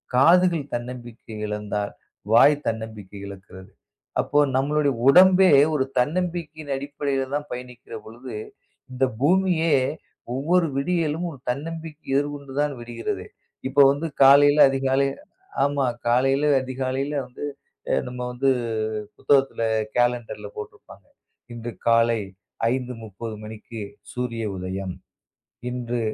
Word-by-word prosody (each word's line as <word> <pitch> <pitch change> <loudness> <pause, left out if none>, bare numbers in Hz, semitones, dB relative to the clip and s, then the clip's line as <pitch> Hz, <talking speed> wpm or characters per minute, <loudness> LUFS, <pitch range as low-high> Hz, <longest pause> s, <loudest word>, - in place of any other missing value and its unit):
காதுகள் 170 +3 +5
தன்னம்பிக்கை 120 -2 -7
இழந்தால் 105 -1 -3 0.4
வாய் 145 +6 +7
தன்னம்பிக்கை 110 -3 -5
இழக்கிறது. 95 -1 -12 0.5
அப்போ 145 - +1 0.2
நம்முடைய 145 +1 +2 0.2
உடம்பே 185 +4 +7 0.2
ஒரு 135 -3 +1
தன்னம்பிக்கையின் 155 0 -2
அடிப்படையில் 140 -1 -3
தான் 145 0 -4
பயணிக்கிற 125 -1 -8
பொழுது, 120 +3 -10 0.6
இந்த 130 +1 +1 0.2
பூமியே 170 0 +3 0.6
ஒவ்வொரு 165 +6 +2
விடியலும் 165 +2 0
ஒரு 140 - -12
தன்னம்பிக்கை 160 +3 -5
எதிர்கொண்டு 145 -1 -3
தான் 150 -1 0
விடுகிறதே. 120 0 -5 0.4
இப்ப 135 - -14
வந்து 145 +4 -2 0.2
காலையில 145 +2 +7
அதிகாலை 135 0 +1 0.6
ஆமா 140 -1 +1 0.2
காலையில 135 +4 +3 0.2
அதிகாலையில 130 +2 -2
வந்து 125 - -10 0.5
அ, - - +3
நம்ம 125 0 -7
வந்து 130 +2 +1 0.7
புத்தகத்துல 135 -4 +2 0.3
கேலண்டர்ல 120 -3 0
போட்டு 105 - -7
இருப்பாங்க. - - -17 0.5
இன்று 120 0 -6 0.2
காலை 115 0 +4 0.6
5.30 115 -4 -6
மணிக்கு 110 +1 -9 0.3
சூரிய 120 -2 -3
உதயம். 95 0 -4 0.8
இன்று 120 -1 -3
130 Hz, 105 wpm, -24 LUFS, 120-145 Hz, 0.8 s, வாய்